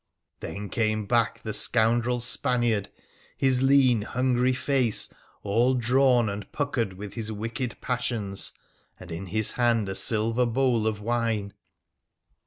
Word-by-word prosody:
Then 100 - -6
back - - -10
came 110 -2 0 0.4
the 110 - -4
scoundrel 120 +2 +2
Spaniard, 120 -4 0 0.5
his 130 -2 +2
lean, 135 -4 +4
hungry 125 +2 +1
face 130 -3 0 0.3
all 115 +6 +2
drawn 125 0 +3
and 100 0 -6
puckered 130 -9 -2
with 100 +2 -8
his 110 -2 -3
wicked 115 +3 -4
passions, 115 -6 -2 0.5
and 90 -2 -11
in 85 +4 -5
bis 110 +3 -1
hand 120 -4 +1
a 95 - -3
silver 115 +4 +2
bowl 120 -2 +1
of 105 -1 -2
wine. 115 -3 -1
115 Hz, 130 wpm, -26 LUFS, 105-125 Hz, 0.5 s, lean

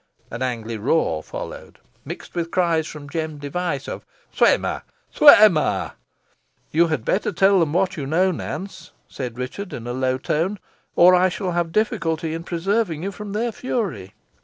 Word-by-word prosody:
An 120 - -6
angry 115 -3 -3
roar 110 - +1
followed, - - -8 0.3
mixed - - -8
with 170 -1 -2
cries 170 -3 +1
from 150 -2 -9
Jem 155 0 -4
Device, 145 0 -3
of - - -6 0.3
"swim - - +4
her! - - -2 0.3
swim 215 - +8
her!" - - -1 0.8
"You 170 +2 +4
had 155 -8 -2
better 210 - 0
tell 195 +2 +4
them 160 -4 +1
what 185 +1 +1
you 140 -3 -4
know, 180 +6 +2
Nance," 190 +3 -7
said 125 -3 -6
Richard, 155 +9 -5
in 115 - -6
a 120 - -3
low 130 0 0
tone, 165 +9 -1 0.4
"or 180 +1 +7
I 180 +1 +4
shall 185 0 -3
have 170 -1 -1
difficulty 165 -6 0
in 165 +1 -5
preserving 175 -1 -1
you 195 - -2
from 200 +1 -8
their 230 +3 -1
fury." 195 - -4
165 Hz, 170 wpm, -22 LUFS, 145-190 Hz, 0.8 s, swim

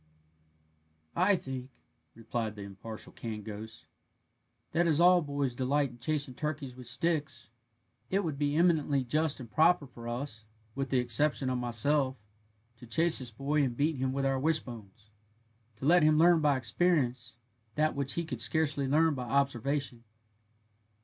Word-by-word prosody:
"I 190 +3 +4
think," 130 -5 -6 0.5
replied 115 -1 -4
the 105 - -8
impartial 100 +3 -9
canned 110 -3 -6
ghost, 110 +1 -8 0.8
"that 170 +2 +2
as 155 -2 +2
all 180 +1 +6
boys 140 -4 -2
delight 135 +2 0
in 120 - -15
chasing 145 +1 -1
turkeys 140 -2 -4
with 125 -2 -10
sticks, 140 -3 -1 0.6
it 195 +2 +1
would 155 -5 -3
be 145 0 0
eminently 155 -5 +2
just 155 +4 0
and 120 -3 -10
proper 160 0 +4
for 120 -2 -11
us, 120 -3 -5 0.3
with 135 +1 -3
the 130 - +1
exception 130 +3 0
of 125 - -1
myself, 130 +3 +1 0.6
to 120 - -13
chase 165 +5 +3
this 125 -2 -4
boy 140 +6 0
and 125 -4 -1
beat 150 +1 +1
him 130 0 -1
with 135 +1 -1
our' 135 -1 +1
wishbones, 115 -9 -3 0.6
to 120 - -7
let 175 +4 +6
him 155 0 +4
learn 170 0 +5
by 145 -2 +3
experience 125 -2 0 0.4
that 155 0 +1
which 140 -1 -1
he 170 - -2
could 160 - -5
scarcely 145 -3 +1
learn 155 +3 +3
by 125 -3 -4
observation." 140 -2 0
135 Hz, 155 wpm, -30 LUFS, 120-155 Hz, 0.8 s, all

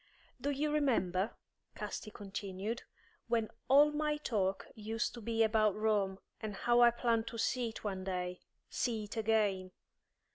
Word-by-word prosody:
"Do 285 - 0
you 290 +2 0
remember," 225 -9 +1 0.4
Casti 215 - -5
continued, 200 +2 -4 0.5
"when 225 -2 +1 0.2
all 290 +3 +7
my 300 0 0
talk 195 -9 0
used 220 +2 -2
to 235 - -8
be 225 +1 +2
about 215 -2 +3
Rome, 210 -3 +1 0.2
and 215 -2 -4
how 240 +4 +3
I 240 - +9
planned 235 -1 +1
to 230 - -5
see 240 +1 +1
it 220 - -9
one 190 -3 -3
day 180 -1 -2 0.3
see 225 -4 -1
it 205 - -7
again. 210 -4 +1
220 Hz, 150 wpm, -34 LUFS, 200-240 Hz, 0.5 s, I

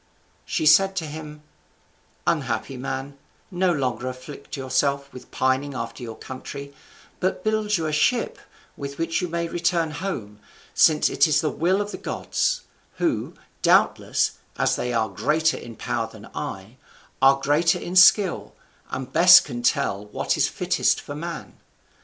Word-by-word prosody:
She - - -1
said 190 +6 +5
to 170 -4 -2
him: 150 0 -9 0.8
"Unhappy 135 - -1
man, 135 +2 -5 0.3
no 180 0 +1
longer 130 -6 -2
afflict 140 +4 -9
yourself 140 +1 -1
with 125 -1 -11
pining 130 +2 0
after 115 0 -5
your 115 -2 -7
country, 140 +2 -8 0.5
but 185 0 -1
build 215 -1 +1
you 165 - -3
a 155 - -1
ship, 235 +11 +1 0.4
with 140 0 -7
which 165 +3 -1
you 180 - -1
may 170 0 -2
return 170 -1 0
home, 140 - -5 0.3
since 155 -2 +4
it - - +3
is 150 0 +3
the 155 -3 -1
will 185 +5 +1
of 205 0 -4
the - - -7
gods; - - -1 0.3
who, - - -2 0.3
doubtless, - - +2 0.2
as - - +2
they 125 - -2
are 115 -2 +1
greater 155 +11 +1
in 115 -1 -10
power - - -3
than - - -13
I, 95 +6 -6 0.4
are 135 +1 +6
greater 145 +5 +2
in 175 - -6
skill, 185 0 +5 0.3
and 130 0 -6
best 175 +2 +8
can 120 -4 -6
tell 105 -3 0
what 105 - -1
is - - +2
fittest - - +1
for - - -8
man. - - -7
145 Hz, 155 wpm, -24 LUFS, 130-170 Hz, 0.8 s, best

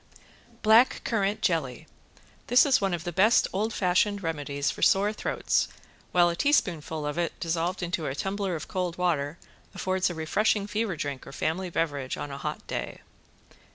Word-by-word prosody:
~BLACK 225 +4 +5
CURRANT 215 -2 -1
JELLY~ 140 -8 0 0.6
This 245 +4 +6
is 275 -6 +3
one 195 -3 +1
of 165 - -7
the 175 - -3
best 205 +7 +4
old 215 +4 0
fashioned 200 +1 +1
remedies 145 -3 -2
for - - -10
sore 205 +2 +4
throats, - - 0 0.4
while 175 -1 +5
a 170 - 0
teaspoonful 165 - 0
of 150 +3 -2
it 170 - -2
dissolved 170 +2 -1
into 170 -2 -2
a 135 - -3
tumbler 195 +1 -2
of 155 - -6
cold 180 -2 -3
water 165 -4 0 0.4
affords 185 0 0
a 175 - -5
refreshing 200 +6 +1
fever 210 -2 -2
drink 145 -3 -5
or - - -8
family 170 +6 -2
beverage 145 -6 -2
on 145 - -5
a 140 - -6
hot - - -5
day. - - -5
175 Hz, 170 wpm, -27 LUFS, 160-200 Hz, 0.6 s, This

